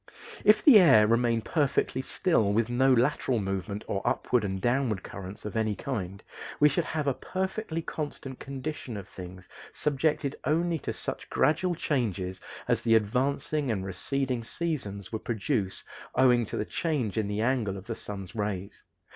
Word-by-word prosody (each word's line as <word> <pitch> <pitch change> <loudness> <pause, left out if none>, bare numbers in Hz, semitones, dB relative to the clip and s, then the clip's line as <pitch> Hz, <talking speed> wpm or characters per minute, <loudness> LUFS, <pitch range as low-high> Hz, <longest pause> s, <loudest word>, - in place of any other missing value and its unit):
If 210 - +5
the 255 -8 +9
air 135 - +7
remained 115 0 +2
perfectly 140 -4 +1
still 130 - +1
with 115 +2 +1
no 130 +2 +4
lateral 125 0 +2
movement 95 +1 -3
or 100 - -1
upward 125 -3 +1
and 95 -1 -2
downward 120 -3 0
currents 95 +1 -8
of 105 - -5
any 110 -2 +1
kind, 100 -9 -4 0.4
we 150 - +7
should 165 +4 0
have 155 -2 -2
a 140 - +2
perfectly 190 - -3
constant 140 -5 -5
condition 135 -3 -5
of 100 -1 -8
things 90 -1 -10 0.3
subjected 150 -1 0
only 165 +3 +1
to - - -3
such - - -5
gradual 170 +4 +2
changes 100 - -1 0.3
as - - +2
the 115 -1 +4
advancing 135 +6 +1
and 100 -4 -1
receding 125 +6 -1
seasons 115 - -3
would 110 -1 -4
produce 110 -3 -1 0.3
owing 125 -3 +4
to - - -4
the 105 - -1
change 140 - -1
in 110 -2 0
the 105 +1 -2
angle 115 -5 0
of 95 - -10
the 115 - -3
sun's 100 -4 -7
rays. 100 -2 -4
120 Hz, 165 wpm, -28 LUFS, 100-145 Hz, 0.4 s, the